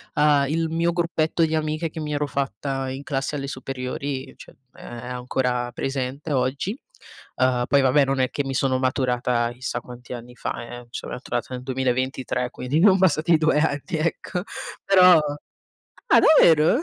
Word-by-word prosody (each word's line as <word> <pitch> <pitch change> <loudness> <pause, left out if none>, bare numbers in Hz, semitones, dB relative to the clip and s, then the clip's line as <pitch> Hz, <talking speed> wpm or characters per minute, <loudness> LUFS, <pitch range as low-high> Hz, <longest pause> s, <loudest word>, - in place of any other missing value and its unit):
ehm, 150 -1 +4
il 165 +3 -1
mio 165 +1 +1
gruppetto 165 -1 0
di 160 - -3
amiche 155 +1 -1
che 160 - -7
mi 150 -1 -3
ero 145 0 0
fatta 135 0 -3
in 135 +1 -5
classe 135 +1 -2
alle 140 -1 -4
superiori, 130 +1 -5
cioè - - -14 0.2
è - - -15
ancora 125 0 -3
presente 135 +4 -4
oggi. 140 - -1 0.6
Uhm, 125 -1 +2
poi 140 -1 +4
vabbè 135 +2 +4
non 135 0 -1
è 130 -1 +2
che 145 - -1
mi 135 - -3
sono 130 0 +1
maturata 125 -2 0
chissà 125 +1 -4
quanti 125 0 -10
anni 125 +1 -9
fa - - -4
eh-eh, 120 0 -10
so' - - -6
maturata 120 -1 -4
nel 125 - -7
2023, 130 -1 -1
quindi 125 +5 -1
non 190 +1 +6
passati 165 -2 +3
2 155 -1 +2
anni, 150 +1 -1
ecco. 170 +2 -2 0.4
Però 185 -3 +7 0.9
Ah - - +6
davvero? 170 - +5
135 Hz, 165 wpm, -23 LUFS, 125-155 Hz, 0.9 s, Però